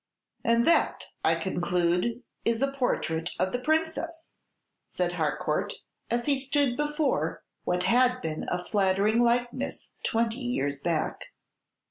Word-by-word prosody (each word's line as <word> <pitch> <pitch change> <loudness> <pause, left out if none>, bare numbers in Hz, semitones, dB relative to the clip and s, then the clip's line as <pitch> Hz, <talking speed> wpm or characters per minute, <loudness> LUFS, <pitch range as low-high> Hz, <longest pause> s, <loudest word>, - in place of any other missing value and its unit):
"And 235 +1 +3
that, 335 - +3 0.2
I - - +4
conclude, 180 +5 0 0.2
is 230 +2 +1
a 275 - +1
portrait 175 -11 -1
of 185 +2 +1
the 245 - -1
Princess," 320 +3 -1 0.5
said - - -2
Harcourt, - - -1 0.3
as 240 0 0
he 280 -2 +3
stood 275 -1 +1
before 295 +1 0 0.2
what 180 0 +1
had 250 +4 +4
been 160 -8 -4
a 180 0 -2
flattering 205 +3 +2
likeness 240 +2 0
twenty 230 +1 0
years 145 - -1
back. 165 -1 -1
235 Hz, 125 wpm, -28 LUFS, 180-270 Hz, 0.5 s, I